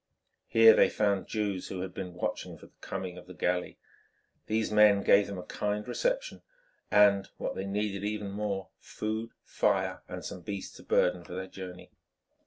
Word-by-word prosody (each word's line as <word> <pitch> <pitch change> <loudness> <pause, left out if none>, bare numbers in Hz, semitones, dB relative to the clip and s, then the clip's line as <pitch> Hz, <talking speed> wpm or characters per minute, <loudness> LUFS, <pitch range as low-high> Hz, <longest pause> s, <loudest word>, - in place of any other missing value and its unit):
Here 115 -1 +8
they - - +5
found 100 -3 0
Jews 100 -4 -2
who 95 -2 -5
had 95 -1 -5
been 90 -2 -6
watching 90 - -3
for - - -14
the - - -19
coming 90 -1 -5
of - - -15
the 90 - -11
galley. 90 +2 -1 0.7
These 110 0 0
men 105 -2 +6
gave 100 0 +5
them 100 - -6
a 90 - -6
kind 105 +3 -3
reception, - - -1 0.5
and, 100 -1 +5
what - - -3
they 95 - -4
needed 100 0 -2
even 105 -1 -3
more, 100 -1 -3
food, 110 +1 -4
fire - - 0
and - - -6
some 90 - -6
beasts 100 +2 -6
of - - -15
burden 90 -1 +2
for 90 - -9
their 95 0 -4
journey. 90 -1 -9
100 Hz, 180 wpm, -30 LUFS, 95-105 Hz, 0.7 s, Here